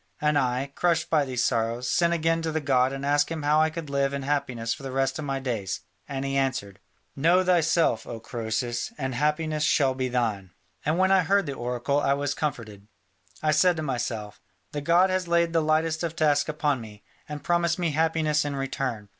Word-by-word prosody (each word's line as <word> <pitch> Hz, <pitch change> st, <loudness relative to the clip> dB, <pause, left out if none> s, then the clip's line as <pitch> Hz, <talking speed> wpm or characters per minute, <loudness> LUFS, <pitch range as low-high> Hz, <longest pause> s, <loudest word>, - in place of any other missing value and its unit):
And 150 Hz, 0 st, +1 dB
I, 130 Hz, 0 st, 0 dB
crushed 170 Hz, -1 st, 0 dB
by 150 Hz, -3 st, +3 dB
these 125 Hz, -2 st, -1 dB
sorrows, 115 Hz, +1 st, 0 dB
sent 170 Hz, +6 st, +2 dB
again 165 Hz, 0 st, +1 dB
to 165 Hz, 0 st, -2 dB
the 160 Hz, -, -1 dB
god 130 Hz, -3 st, +2 dB
and 135 Hz, 0 st, -5 dB
asked 145 Hz, +1 st, +2 dB
him 165 Hz, -2 st, -4 dB
how 150 Hz, +1 st, +4 dB
I 160 Hz, -, +3 dB
could 160 Hz, -1 st, -6 dB
live 140 Hz, 0 st, 0 dB
in 140 Hz, -, -4 dB
happiness 125 Hz, -5 st, -1 dB
for -, -, -10 dB
the 135 Hz, -1 st, -6 dB
rest 135 Hz, +1 st, 0 dB
of 155 Hz, -, -4 dB
my 135 Hz, -1 st, -2 dB
days, 110 Hz, -8 st, -3 dB, 0.3 s
and 135 Hz, -1 st, -4 dB
he 135 Hz, 0 st, -2 dB
answered: 130 Hz, -8 st, -1 dB, 0.4 s
"'Know 170 Hz, +6 st, +4 dB
thyself, 170 Hz, -8 st, +2 dB
O 115 Hz, -, -6 dB
Croesus, 115 Hz, +1 st, -3 dB
and 130 Hz, -3 st, -3 dB
happiness 150 Hz, +3 st, 0 dB
shall 135 Hz, -3 st, +3 dB
be 130 Hz, 0 st, -2 dB
thine.' 110 Hz, -7 st, -2 dB, 0.3 s
"And 155 Hz, +3 st, 0 dB
when 190 Hz, +1 st, +3 dB
I 190 Hz, -1 st, +5 dB
heard 195 Hz, +2 st, +2 dB
the 140 Hz, -, -4 dB
oracle, 125 Hz, +3 st, -1 dB
I 140 Hz, -, +2 dB
was 140 Hz, 0 st, -1 dB
comforted. 110 Hz, -9 st, -5 dB, 0.6 s
I 155 Hz, -, +3 dB
said 170 Hz, +3 st, +4 dB
to 160 Hz, -, -3 dB
myself, 120 Hz, -6 st, -4 dB, 0.3 s
the 145 Hz, -, -4 dB
god 175 Hz, +5 st, +4 dB
has 185 Hz, -1 st, -1 dB
laid 170 Hz, 0 st, +2 dB
the 165 Hz, -, +3 dB
lightest 155 Hz, +1 st, +1 dB
of 165 Hz, -2 st, -3 dB
tasks 150 Hz, -2 st, +2 dB
upon 150 Hz, -4 st, 0 dB
me, 105 Hz, -2 st, -12 dB, 0.3 s
and 150 Hz, -1 st, -6 dB
promised 170 Hz, -1 st, +1 dB
me 175 Hz, -3 st, 0 dB
happiness 155 Hz, -1 st, +1 dB
in 145 Hz, -1 st, -3 dB
return. 130 Hz, -6 st, -3 dB
145 Hz, 210 wpm, -26 LUFS, 125-160 Hz, 0.6 s, I